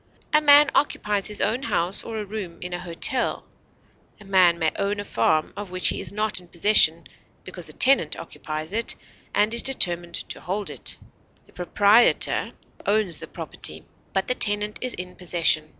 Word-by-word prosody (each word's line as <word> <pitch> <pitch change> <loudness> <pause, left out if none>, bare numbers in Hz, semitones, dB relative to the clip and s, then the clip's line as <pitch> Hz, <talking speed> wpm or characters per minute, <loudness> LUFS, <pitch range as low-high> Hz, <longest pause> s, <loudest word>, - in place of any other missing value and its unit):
A 305 - +5
man 290 -1 +6
occupies 210 -8 0
his 210 -1 0
own 225 +5 0
house 185 -9 0
or 225 -1 -6
a 210 - -4
room 195 -5 -7
in 180 0 -6
a 175 - -4
hotel; 180 +9 -1 0.7
a 205 - -15
man 185 -3 +4
may 160 -2 0
own 200 +1 -2
a 205 - -5
farm 155 - 0
of 205 -2 -7
which 185 0 0
he - - -3
is - - -5
not 210 -1 0
in 180 - -17
possession 170 -2 +4 0.4
because - - -8
a - - -3
tenant 255 - +4
occupies 155 +3 -7
it 230 +2 0 0.4
and 210 +2 +2
is 235 - +3
determined 175 -9 +2
to - - -7
hold 195 +4 -4
it; - - -6 0.5
the - - -24
proprietor 205 +6 +2 0.4
owns 200 -5 0
the - - -9
property, - - -4 0.3
but 190 - -1
the - - +3
tenant 210 -2 +1
is 255 -1 -2
in 180 0 -8
possession. 165 -3 0
200 Hz, 180 wpm, -23 LUFS, 175-215 Hz, 0.7 s, man